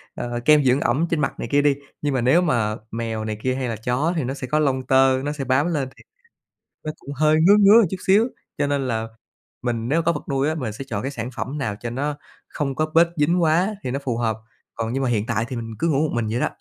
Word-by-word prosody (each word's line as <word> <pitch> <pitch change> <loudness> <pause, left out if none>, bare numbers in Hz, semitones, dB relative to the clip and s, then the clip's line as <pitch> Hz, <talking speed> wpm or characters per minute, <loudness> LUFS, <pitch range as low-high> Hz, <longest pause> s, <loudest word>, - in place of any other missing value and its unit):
ờ, 120 0 -4
kem 150 -1 +6
dưỡng 130 +1 +3
ẩm 145 +8 +1
trên 165 - 0
mặt 135 - -2
này - - -3
kia 145 - +4
đi. 145 -1 +3 0.3
Nhưng 145 -1 0
mà 130 - 0
nếu 130 +9 +4
mà 115 -10 +1 0.2
mèo 115 -1 -3
này 110 -1 -3
kia 130 0 0
hay 130 -1 -2
là 115 - -2
chó 125 +9 -1
thì 155 - 0
nó 130 - -2
sẽ 135 -2 -6
có 150 +5 +1
lông 130 -3 0
tơ, 130 0 +4
nó 145 - -1
sẽ 145 -2 -4
bám 135 +5 +2
lên 135 -3 -1
thì, - - -17
à, - - -71 0.7
nó 155 - -3
cũng 140 - -9
hơi 155 +2 +3
ngứa 200 +5 +6
ngứa 210 +3 +7
một 220 - +3
chút 190 - -2
xíu, 210 +6 +4 0.3
cho 145 - +1
nên 140 -2 -1
là 115 -1 -2 0.5
mình 120 -2 -2
nếu 160 +5 +2
mà 165 - -4
có 170 - +3
vật 150 - -6
nuôi 135 +2 +1
á, 160 - 0
mình 125 -9 -4
sẽ 135 +6 -7
chọn 100 -5 -3
cái 135 - -3
sản 125 -3 -5
phẩm 145 +3 -4
nào 120 -7 -2
cho 120 +1 -4
nó 145 +4 -2 0.3
không 140 -3 -3
có 155 +3 0
bết 170 +1 +6
dính 170 +4 +2
quá 175 +6 +2
thì 125 - -2
nó 135 - -1
phù 125 -4 -2
hợp, 115 -2 0 0.4
còn 115 +1 -3
nhưng 135 - -1
mà 130 - +1
hiện 110 -2 0
tại 110 - 0
thì 125 - -5
mình 115 -1 -6
cứ 165 - +1
ngủ 140 -4 +2
một - - -5
mình 115 -2 -1
vậy 120 +3 -1
đó. - - +2
135 Hz, 290 wpm, -22 LUFS, 120-155 Hz, 0.7 s, ngứa